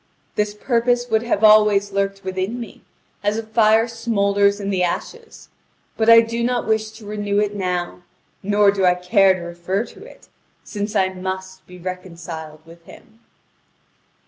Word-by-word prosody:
This 210 Hz, 0 st, -1 dB
purpose 245 Hz, +2 st, 0 dB
would 220 Hz, 0 st, +3 dB
have 230 Hz, -3 st, -1 dB
always 210 Hz, -2 st, +5 dB
lurked 195 Hz, 0 st, -2 dB
within 190 Hz, +5 st, -3 dB
me, 235 Hz, -, -9 dB, 0.4 s
as 205 Hz, +1 st, 0 dB
a 225 Hz, -, -3 dB
fire 220 Hz, 0 st, +3 dB
smoulders 200 Hz, -3 st, +1 dB
in 200 Hz, 0 st, -3 dB
the 185 Hz, -2 st, 0 dB
ashes; 450 Hz, -, -5 dB, 0.5 s
but 225 Hz, 0 st, +1 dB
I 230 Hz, 0 st, +9 dB
do 230 Hz, +1 st, -3 dB
not 245 Hz, 0 st, 0 dB
wish 220 Hz, 0 st, 0 dB
to 220 Hz, -1 st, -13 dB
renew 205 Hz, -1 st, -2 dB
it 210 Hz, 0 st, -1 dB
now, 180 Hz, -2 st, -3 dB, 0.4 s
nor 205 Hz, 0 st, +3 dB
do 195 Hz, -1 st, -2 dB
I 180 Hz, -1 st, +4 dB
care 185 Hz, +2 st, +3 dB
to 185 Hz, -, -8 dB
refer 175 Hz, +5 st, -3 dB
to -, -, -14 dB
it, -, -, -16 dB, 0.4 s
since 205 Hz, 0 st, -5 dB
I 190 Hz, -1 st, +2 dB
must 190 Hz, 0 st, -7 dB
be 180 Hz, -, -12 dB
reconciled 170 Hz, -4 st, -8 dB
with 165 Hz, +1 st, -16 dB
him." 225 Hz, -, -17 dB
200 Hz, 165 wpm, -20 LUFS, 185-220 Hz, 0.5 s, I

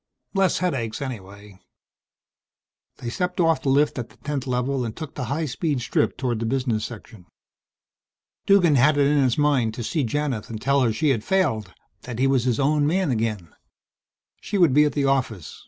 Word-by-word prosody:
"Less 195 Hz, -2 st, +2 dB
headaches 120 Hz, -12 st, -2 dB
anyhow." 100 Hz, -6 st, -8 dB, 1.4 s
They 120 Hz, -, -5 dB
stepped 180 Hz, +6 st, -3 dB
off 165 Hz, -2 st, +3 dB
the 135 Hz, -, -1 dB
lift 145 Hz, 0 st, +2 dB
at 120 Hz, -, -5 dB
the -, -, -21 dB
10th 140 Hz, -3 st, -4 dB
Level 125 Hz, +1 st, -1 dB
and 115 Hz, -2 st, -5 dB
took 155 Hz, -3 st, -7 dB
the 125 Hz, -, -4 dB
high 145 Hz, +7 st, -2 dB
speed 145 Hz, +1 st, -2 dB
strip 120 Hz, -, 0 dB
toward 125 Hz, -4 st, -1 dB
the 115 Hz, -, -2 dB
business 120 Hz, -4 st, -1 dB
section. 110 Hz, -4 st, -11 dB, 1.2 s
Duggan 180 Hz, -7 st, +5 dB
had 145 Hz, +4 st, +4 dB
it 140 Hz, -, +4 dB
in 145 Hz, +1 st, +3 dB
his 130 Hz, -3 st, +1 dB
mind 135 Hz, -7 st, +2 dB
to 120 Hz, -, -5 dB
see 150 Hz, +6 st, -1 dB
Janith 130 Hz, -2 st, -2 dB
and 110 Hz, -2 st, -5 dB
tell 140 Hz, +4 st, +2 dB
her 120 Hz, -3 st, +2 dB
she 110 Hz, +8 st, 0 dB
had 115 Hz, -6 st, +1 dB
failed 135 Hz, -, 0 dB, 0.3 s
that 120 Hz, -1 st, -7 dB
he 130 Hz, -, +2 dB
was 135 Hz, -2 st, +2 dB
his 125 Hz, -3 st, +1 dB
own 145 Hz, +1 st, +2 dB
man 180 Hz, -1 st, +1 dB
again. 110 Hz, -8 st, -2 dB, 0.9 s
She 205 Hz, -, -3 dB
would 170 Hz, -8 st, +4 dB
be 150 Hz, +2 st, +5 dB
at 150 Hz, -, 0 dB
the 145 Hz, -2 st, 0 dB
office. 130 Hz, -, -1 dB
135 Hz, 190 wpm, -23 LUFS, 115-150 Hz, 1.4 s, Duggan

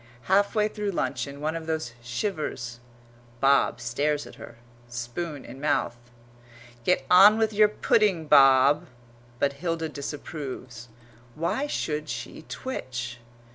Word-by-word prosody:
Halfway 205 Hz, +2 st, +2 dB
through 210 Hz, -1 st, -4 dB
luncheon 140 Hz, -4 st, -3 dB
one 155 Hz, +2 st, -1 dB
of 165 Hz, -1 st, -6 dB
those 155 Hz, -7 st, -2 dB
shivers; 120 Hz, -, -4 dB, 0.6 s
Bob 135 Hz, -1 st, +3 dB
stares 145 Hz, +5 st, -1 dB
at -, -, -12 dB
her, -, -, -11 dB, 0.3 s
spoon 130 Hz, +6 st, -5 dB
in 135 Hz, +2 st, -10 dB
mouth. 145 Hz, -5 st, 0 dB, 0.9 s
"Get 180 Hz, -, +2 dB
on 200 Hz, +4 st, +8 dB
with 220 Hz, -1 st, +1 dB
your 210 Hz, +1 st, +6 dB
pudding, 205 Hz, -5 st, +2 dB
Bob;" 135 Hz, +1 st, +6 dB, 0.5 s
but 140 Hz, +2 st, +1 dB
Hilda 165 Hz, +1 st, -3 dB
disapproves. 135 Hz, -5 st, -7 dB, 0.5 s
"Why 170 Hz, -, -1 dB
should 150 Hz, -, -3 dB
she 120 Hz, +4 st, -6 dB
twitch?" 125 Hz, -, -5 dB
150 Hz, 120 wpm, -26 LUFS, 130-180 Hz, 0.9 s, on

